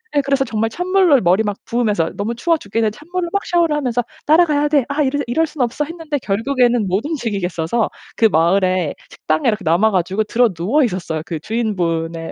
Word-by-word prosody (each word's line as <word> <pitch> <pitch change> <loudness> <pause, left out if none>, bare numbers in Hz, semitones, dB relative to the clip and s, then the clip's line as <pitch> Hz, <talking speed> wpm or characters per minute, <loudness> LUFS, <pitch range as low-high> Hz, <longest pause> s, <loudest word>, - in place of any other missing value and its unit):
예 285 - +4
그래서 275 -1 +1
정말 225 -2 -1
찬물로 360 - +3
머리 185 +4 +3
막 205 -2 -2
부으면서 210 -9 0
너무 210 +4 -2
추워 330 +8 +1
죽겠는데 220 -3 -1
찬물로 345 +3 -4
막 400 +2 -1
샤워를 340 -3 +2
하면서 250 -4 -1 0.2
'따라가야 305 -2 +4
돼. 290 -3 +3
아 290 +2 +1
이러 285 +1 0
이럴 320 +7 +1
순 295 -2 -6
없어.' 250 +5 0
했는데 325 -2 -4
결국에는 240 +1 +1
못 190 +6 -1
움직이겠어서 210 - -2 0.3
그 225 - +3
마을에 185 -2 +2
식당에 155 0 -1
이렇게 210 -2 -2
남아 175 +8 +3
가지고 190 +2 0
드러누워 225 - +1
있었어요. 180 -8 -2
그 165 -3 -4
주인분의 170 -6 -2
230 Hz, 435 characters per minute, -18 LUFS, 185-290 Hz, 0.3 s, 예